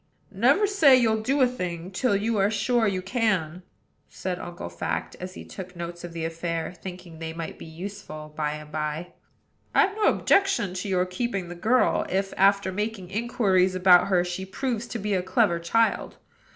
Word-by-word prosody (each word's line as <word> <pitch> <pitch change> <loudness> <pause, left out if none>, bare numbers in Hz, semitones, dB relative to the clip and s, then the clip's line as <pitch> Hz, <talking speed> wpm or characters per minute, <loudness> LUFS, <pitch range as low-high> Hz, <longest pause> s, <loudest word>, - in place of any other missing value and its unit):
"Never 255 - +3
say 335 -10 +6
you'll 220 -3 +2
do 270 +5 +1
a 255 - +6
thing 180 -7 -5
till 205 +3 +1
you 215 +2 0
are 195 +1 +3
sure 220 +2 +1
you 185 -2 -1
can," 190 -6 0 0.5
said 180 -1 -4
Uncle 175 - -7
Fact, 85 0 -4
as 185 +1 -7
he - - -9
took 185 -1 -9
notes 170 0 -6
of 175 - -6
the 165 -1 -4
affair, 165 +1 -3
thinking 180 -3 -10
they 160 0 -5
might 165 0 -6
be - - -9
useful 160 -3 -8
by 150 -1 -1
and 150 0 -9
by. 155 +3 -3 0.6
"I've 390 +2 +4
no 430 -1 +1
objection 390 - +3
to 185 +2 -4
your 180 -1 +2
keeping 190 -1 -3
the - - -5
girl, 230 +8 +2
if, 195 +1 -1
after 195 0 +3
making 205 -2 -4
inquiries 195 -4 +2
about 180 -1 +6
her, 180 -3 +3
she 180 +1 -4
proves 235 +4 -3
to 235 - -4
be 210 -1 -2
a 185 - +2
clever 180 -2 +2
child. 225 +7 +1
190 Hz, 185 wpm, -26 LUFS, 175-220 Hz, 0.6 s, say